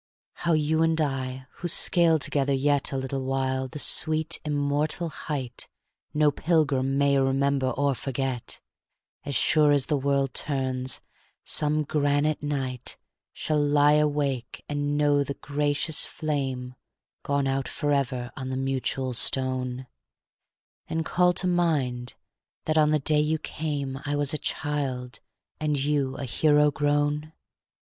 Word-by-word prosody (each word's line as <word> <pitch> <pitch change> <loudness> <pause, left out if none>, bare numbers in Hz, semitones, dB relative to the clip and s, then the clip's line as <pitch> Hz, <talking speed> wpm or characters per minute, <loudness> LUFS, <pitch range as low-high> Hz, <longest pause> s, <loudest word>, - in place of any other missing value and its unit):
How 170 -1 -1
you 155 +1 +1
and 165 0 +2
I, 130 -3 -2
who 175 - -4
scale 170 -1 +5
together 140 -1 0
yet 145 +1 +1
A 135 - -2
little 130 0 -3
while 130 0 -1
the 130 - -9
sweet, 155 +1 +3
immortal 150 +3 -1
height 135 -6 -6 0.4
No 150 0 +3
pilgrim 140 -4 +1
may 140 -1 +3
remember 135 0 +1
or 140 +2 0
forget, 130 -1 -4 0.7
As 140 -2 -3
sure 150 +4 +4
as 140 -2 +3
the 150 - 0
world 140 -1 0
turns, 130 -2 -1 0.4
some 150 0 +2
granite 145 0 0
night 135 -4 -3 0.3
Shall 155 -1 -1
lie 145 0 +4
awake 145 -5 -1
and 145 0 -2
know 145 -1 +3
the 140 0 -5
gracious 145 +1 +1
flame 135 -5 -3 0.5
Gone 140 -1 0
out 135 0 -1
forever 135 -4 -1
on 130 -1 -6
the 130 - -3
mutual 135 -1 -1
stone; 130 +1 +1 1.0
And 160 0 -2
call 180 +1 +3
to 185 - -1
mind 145 -9 0 0.5
that 155 - 0
on 155 -1 +4
the 155 - +3
day 150 +1 +1
you 155 +1 0
came 145 -4 -4
I 145 +1 -2
was 145 0 +2
a 155 - -2
child, 135 -4 -3 0.4
and 150 -1 0
you 140 -1 0
a 140 - -4
hero 150 +3 +3
grown? 145 +1 0
145 Hz, 140 wpm, -26 LUFS, 135-150 Hz, 1.0 s, scale